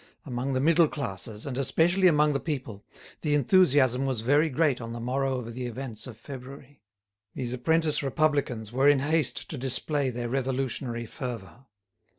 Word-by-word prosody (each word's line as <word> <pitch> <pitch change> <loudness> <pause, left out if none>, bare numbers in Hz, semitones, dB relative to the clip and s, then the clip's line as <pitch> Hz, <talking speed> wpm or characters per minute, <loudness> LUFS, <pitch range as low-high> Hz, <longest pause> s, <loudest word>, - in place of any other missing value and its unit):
Among 130 0 -3
the 130 - +1
middle 165 +3 +4
classes, 110 -6 -5
and 135 -2 -4
especially 170 +7 +3
among 150 -3 +4
the 140 - 0
people, 130 - -5 0.4
the 150 -2 +1
enthusiasm 135 -4 +4
was 130 -5 -1
very 145 +7 +3
great 145 -2 +1
on 115 0 -6
the 120 - -6
morrow 130 +2 -1
of 115 -2 -6
the 125 +1 -4
events 120 -2 -6
of 115 -4 -10
February; 135 +2 -11 0.5
these 125 -1 -3
apprentice 160 +5 +1
republicans 135 -6 0
were 135 +4 +4
in 145 -2 +4
haste 155 -1 0
to 150 - -5
display 135 +2 0
their 120 -1 -4
revolutionary 130 -2 -2
fervour. 120 +1 -7
135 Hz, 160 wpm, -27 LUFS, 120-145 Hz, 0.5 s, middle